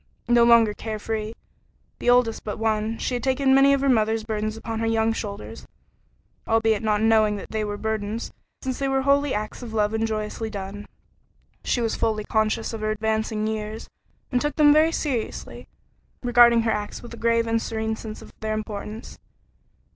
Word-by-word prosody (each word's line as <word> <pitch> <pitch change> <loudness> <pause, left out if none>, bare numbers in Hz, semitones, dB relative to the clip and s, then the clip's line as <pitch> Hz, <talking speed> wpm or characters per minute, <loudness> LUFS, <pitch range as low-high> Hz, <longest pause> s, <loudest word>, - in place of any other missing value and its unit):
No 240 0 +5
longer 230 -2 +6
care 220 0 -5
free, 215 0 -3 0.7
the - - 0
oldest 245 -2 +3
but 210 - -4
one, 220 0 0
she - - -2
had 245 - -1
taken 265 +1 +2
many 275 +1 +6
of 275 -1 +2
her 275 - +1
mother's 220 -3 +2
burdens 215 0 -3
upon 225 0 -4
her 225 - 0
young 225 0 +2
shoulders, 205 -2 -7 0.8
albeit 225 -1 +2
not 215 -1 +1
knowing 220 -2 +4
that 200 - -8
they 220 -1 -1
were 205 -1 -3
burdens, 220 +1 -3 0.3
since 260 -2 -3
they 275 - 0
were 270 0 +1
wholly 280 0 +3
acts 215 +3 -4
of 230 -2 -7
love 210 0 +1
and 220 0 0
joyously 215 +1 -3
done. 200 0 -7 0.8
She 245 - 0
was 225 -1 0
fully 215 -2 0
conscious 220 +1 0
of 225 - -5
her 215 - -1
advancing 220 0 -1
years, 215 0 -4 0.4
and 250 -2 +1
took 295 +1 -1
them 295 -1 +6
very 310 +2 +4
seriously, 265 -9 -4 0.6
regarding 240 -1 +6
her 225 - +1
acts 210 +2 -4
with 240 - -10
a - - -6
grave 230 0 +2
and 225 0 0
serene 220 0 -2
sense 215 -1 -8
of - - -15
their 215 0 -2
importance. 215 0 -6
225 Hz, 185 wpm, -24 LUFS, 215-235 Hz, 0.8 s, longer